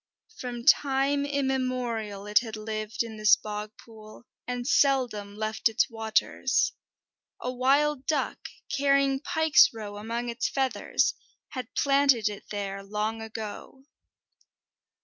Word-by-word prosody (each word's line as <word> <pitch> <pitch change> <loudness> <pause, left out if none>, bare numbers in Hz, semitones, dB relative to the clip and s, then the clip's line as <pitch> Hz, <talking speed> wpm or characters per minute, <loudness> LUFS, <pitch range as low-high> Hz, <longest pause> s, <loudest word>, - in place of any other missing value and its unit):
From 240 -1 -6
time 280 +1 +3
immemorial 255 -7 -2
it 210 0 +4
had 225 -2 -6
lived 215 +1 -3
in 225 -2 -8
this 215 -2 +6
bog 210 0 -6
pool, 220 0 -14 0.2
and 245 -1 -3
seldom 245 -9 +2
left 215 +1 0
its 225 +3 +1
waters. 220 -1 +1 0.7
A 250 - -3
wild 275 +2 +2
duck, 310 - -1 0.3
carrying 275 -1 +3
pike's 320 -1 +5
roe 210 -3 -7
among 230 +3 -4
its 235 +1 -1
feathers, 265 -2 0 0.4
had 255 -3 -7
planted 275 -6 +3
it 205 -1 -9
there 200 -1 -4
long 210 +3 -3
ago. 220 +4 -8
235 Hz, 120 wpm, -27 LUFS, 215-270 Hz, 0.7 s, this